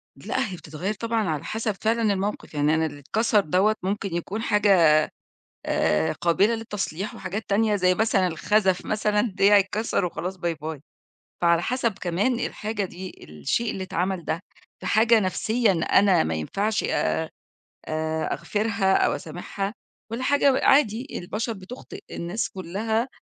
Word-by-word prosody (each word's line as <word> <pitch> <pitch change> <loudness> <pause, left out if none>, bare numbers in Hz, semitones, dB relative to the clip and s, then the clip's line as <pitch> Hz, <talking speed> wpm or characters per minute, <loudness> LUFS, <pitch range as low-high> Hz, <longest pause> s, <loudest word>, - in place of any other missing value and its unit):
لأ، 260 -2 -2
هي 185 - -5
بتتغيّر 170 +5 -4
طبعًا 225 -2 -1
على 150 -2 -2
حسب 220 0 -2
فعلًا 225 -1 +2
الموقِف، 200 -1 -3
يعني 150 +1 +2
أنا 160 0 +1
اللي 145 -2 -6
اتكسر 215 - +2
دوّة 195 +4 +2
ممكن 195 -1 -2
يكون 195 +5 -3
حاجة 200 -7 +4 0.7
آآ، 75 +1 +1
قابلة 195 +7 +2
للتصليح 205 -4 -4
وحاجات 200 +3 -5
تانية 210 +1 +3
زي 185 -2 +3
مثلًا 200 -3 +2
الخزف 190 +3 +1
مثلًا 210 -1 +1
ديّه 200 -2 +3
يتكسر 205 +1 +2
وخلاص 180 +2 -4
باي 170 -1 -1
باي. 155 -2 -6 0.6
فعلى 170 -1 +4
حسب 235 +2 0
كمان 200 +8 0
الحاجة 210 -3 -2
دي 185 +1 -9
الشيء 75 - -1
اللي 190 - -4
اتعمل 185 -1 -2
ده 165 - -1 0.4
في - - -9
حاجة 225 +1 +5
نفسيًا 220 +3 +1
أنا 180 +2 +4
ما 80 - -1
ينفعش 200 - -1
آآ، - - 0 1.2
أغفرها 200 +3 0
أو - - +3
أسامحها 200 +1 -5 0.4
والّا 230 +3 -3
حاجة 280 0 +4
و - - +1
عادي 260 -4 +3
البشر 215 +6 -3
بتخطئ 210 +5 -10
الناس 185 +7 -3
كُلها 215 +6 -2
200 Hz, 145 wpm, -25 LUFS, 175-220 Hz, 1.2 s, حاجة